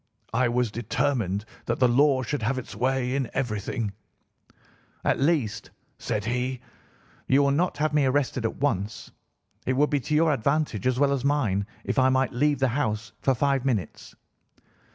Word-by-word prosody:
I 125 +1 +2
was 120 -2 0
determined 115 -3 -1 0.2
that 120 - 0
the 125 - +4
law 130 +2 +3
should 145 +5 -3
have 135 - 0
its 130 - -6
way 130 0 0
in 135 -4 -1
everything. 110 -3 -2 1.1
"'At - - +2
least,' 140 -7 0 0.3
said 105 0 -2
he, 125 +2 -1 0.7
'you 135 +2 +4
will 140 - +3
not 165 +3 +1
have 155 +1 0
me 150 -2 +3
arrested 130 -2 0
at 115 - -1
once. 110 -7 -2 0.6
It 130 - +2
would 145 +3 +2
be 145 - +2
to 150 +4 -2
your 160 0 +4
advantage 140 -4 0
as 130 -1 +1
well 140 -1 +3
as 135 -3 -2
mine 115 -9 +1 0.2
if - - 0
I 130 0 +5
might 130 0 +1
leave 145 +3 +2
the 130 0 +2
house 115 -4 -2
for 135 - +2
five 135 +1 +1
minutes. 110 - -3
130 Hz, 175 wpm, -26 LUFS, 115-140 Hz, 1.1 s, I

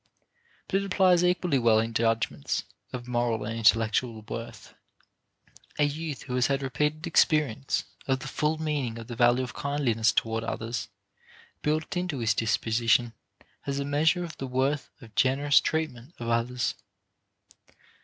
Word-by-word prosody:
But 195 - +1
it - - -4
applies 185 -2 +4
equally 180 -5 +2
well 115 -2 +4
in 115 +1 0
judgments 115 -9 0 0.3
of 125 -1 -6
moral 120 -3 0
and 110 +1 -3
intellectual 115 0 +2
worth. 115 +2 -8 1.0
A 150 - +3
youth 150 -1 -3
who 125 - -6
has 125 -1 +3
had 140 0 0
repeated 150 +4 -1
experience 150 -6 +2 0.2
of 135 -1 +2
the - - -8
full 155 +1 0
meaning 145 -7 -2
of 115 - -7
the 120 - -7
value 120 +2 +4
of 125 - -6
kindliness 125 -6 +1
toward 115 0 0
others 115 +1 -3 0.7
built 155 +4 -1
into 180 -5 -2
his 115 -3 +2
disposition 115 +2 +1 0.5
has 140 0 -3
a 140 - -2
measure 155 +5 +2
of 165 -3 -7
the 135 - -4
worth 135 +3 0
of 115 -3 -14
generous 140 +5 +4
treatment 155 -2 -3
of 115 -1 -5
others. 120 +2 0
130 Hz, 150 wpm, -27 LUFS, 115-150 Hz, 1.0 s, applies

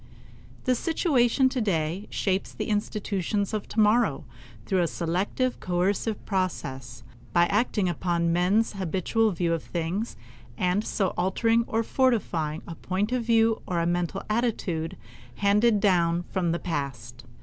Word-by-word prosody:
The 255 - +2
situation 265 -4 +2
of 260 - +4
today 195 - -1
shapes 190 -1 -1
the - - -4
institutions 205 -1 -1
of 210 -2 -3
tomorrow 215 - +2 0.4
through 190 -2 +1
a 170 - +2
selective, 185 +11 -1
coercive 190 +4 -1
process, 135 - -3 0.3
by 170 0 +5
acting 210 0 +1
upon 170 0 0
men's 190 +7 +2
habitual 195 +4 0
view 170 -3 0
of 165 - -1
things, 175 +7 -3 0.4
and 185 +3 +1
so 195 -4 0
altering 225 +5 +2
or 225 +1 0
fortifying 175 - 0
a 170 - -5
point 190 +6 -2
of 250 -1 0
view 225 -1 +3
or 175 -2 0
a 170 - +1
mental 175 +2 -1
attitude 210 -8 -1 0.4
handed 210 +2 +3
down 175 -4 +2
from 180 -3 0
the 170 - 0
past. 130 -7 -5
190 Hz, 140 wpm, -26 LUFS, 170-220 Hz, 0.4 s, by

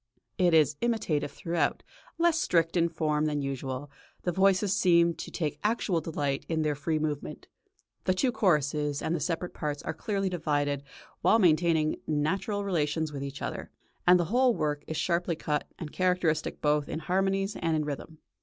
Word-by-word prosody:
It 175 -3 +4
is 150 -2 +4
imitative 220 -12 0
throughout, 165 -4 -1 0.3
less 335 -1 +3
strict 165 -1 +2
in 170 -1 +3
form 155 -2 0
than 150 -2 -1
usual; 135 0 -4 0.3
the 175 - 0
voices 195 +2 +3
seem 170 -4 +4
to - - -7
take 155 -3 -3
actual 210 -6 +1
delight 145 -4 -2
in 160 -1 0
their 150 -1 +1
free 150 +3 -1
movement; 150 -2 -4 0.6
the 185 - +2
two 250 +7 +2
choruses 150 - +1
and 160 - 0
the - - -2
separate 175 +2 -2
parts 150 -2 -4
are - - -3
clearly 195 +3 -2
divided 145 -5 0 0.4
while 225 - +5
maintaining 165 -4 +3
natural 190 +8 0
relations 160 -4 0
with 140 -1 -4
each 140 0 -6
other, - - -4 0.4
and 180 0 +7
the 175 - +1
whole 250 -1 +4
work 150 -1 -1
is 160 - -3
sharply 170 -1 0
cut 150 -1 -2
and 155 -3 -7
characteristic 180 -4 0
both 150 -1 +1
in - - -3
harmonies 195 +4 0
and 165 -1 0
in 155 -1 0
rhythm. 150 +2 -6
160 Hz, 175 wpm, -29 LUFS, 150-185 Hz, 0.6 s, and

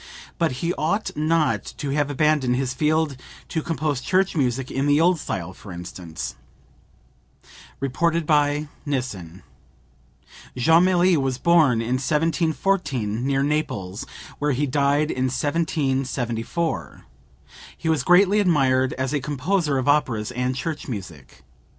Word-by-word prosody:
But 165 -6 +1
he 170 +1 +1
ought 185 +8 -1
not 155 +1 +1
to 140 - -3
have 145 0 0
abandoned 145 -3 +2
his 130 0 -1
field 155 0 +1 0.3
to 160 - -1
compose 155 -4 -2
church 190 +5 +1
music 130 -3 0
in 135 +2 0
the 145 +1 +4
old 175 +1 +3
style, 95 - -4
for 100 - -12
instance." 85 -1 -7 1.5
(Reported 165 +5 0
by 150 0 +2 0.2
Nissen. 95 - -4 1.1
Jomelli 175 +5 +4
was 135 -3 -1
born 145 -6 +4
in 125 +3 -1
1714 155 - 0
near 135 0 +1
Naples, 135 -8 -2 0.3
where 145 -1 +1
he 140 +4 0
died 145 +2 +1
in 130 0 -1
1774. 130 - -2 0.7
He - - -5
was 160 -4 +2
greatly 195 +6 +5
admired 135 -8 +2
as 130 +2 -2
a 145 - +1
composer 150 +2 0
of 130 - -2
operas 125 -7 +1
and 125 +1 -1
church 150 +5 -4
music. 90 - -8
145 Hz, 125 wpm, -23 LUFS, 125-160 Hz, 1.5 s, greatly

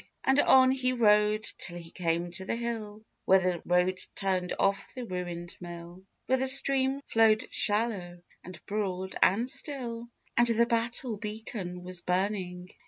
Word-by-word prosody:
And 265 +2 +3
on 260 -2 +6
he 255 -1 +1
rode 210 -2 +3 0.2
till 175 -1 -3
he 165 -1 -10
came 170 -1 -1
to 175 +2 -4
the - - -1
hill, 220 -2 -5 0.2
Where 190 - +6
the 180 -2 -1
road 180 +1 +2 0.2
turned 185 -2 -1
off 195 0 0
by 255 - -5
the - - -8
ruined 175 -2 -5
mill, 175 +1 -9 0.2
Where 260 0 +2
the 265 - +1
stream 270 0 +3
flowed 225 +1 +3
shallow 205 -5 -1 0.2
and 175 -3 -11
broad 190 -3 -3
and 225 +6 +4
still, 240 -4 -4 0.3
And 240 0 +4
the 235 0 +4
battle 235 0 -1
beacon 210 -4 -6
was 180 -1 -3
burning. 180 -1 -2
205 Hz, 160 wpm, -29 LUFS, 180-235 Hz, 0.3 s, on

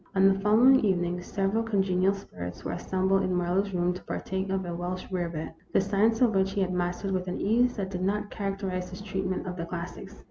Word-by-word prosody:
On 190 0 +6
the 195 0 +3
following 230 +6 +6
evening 180 -3 +1
several 195 +4 0
congenial 195 -3 +2
spirits 90 - -8
were - - -3
assembled 190 +2 +1
in 185 -1 0
Marlowe's 180 +3 +1
room 180 -1 +1
to 180 - -8
partake 190 +1 -3
of 190 -1 -1
a 175 - -4
Welsh 180 +2 -4
rarebit, 170 -4 -3 0.2
the - - +5
science 210 +4 +2
of 240 -3 +5
which 195 0 +2
he 200 - 0
had 185 -1 0
mastered 180 +2 -1
with 185 -1 -1
an 180 - -3
ease 245 +4 +2
that 195 -2 -3
did 180 -2 -3
not 205 +2 -1
characterize 195 -3 -3
his 185 +2 -8
treatment 190 -2 -2
of 180 0 -5
the 170 - -3
classics. 180 +4 -7
190 Hz, 215 wpm, -28 LUFS, 180-200 Hz, 0.2 s, On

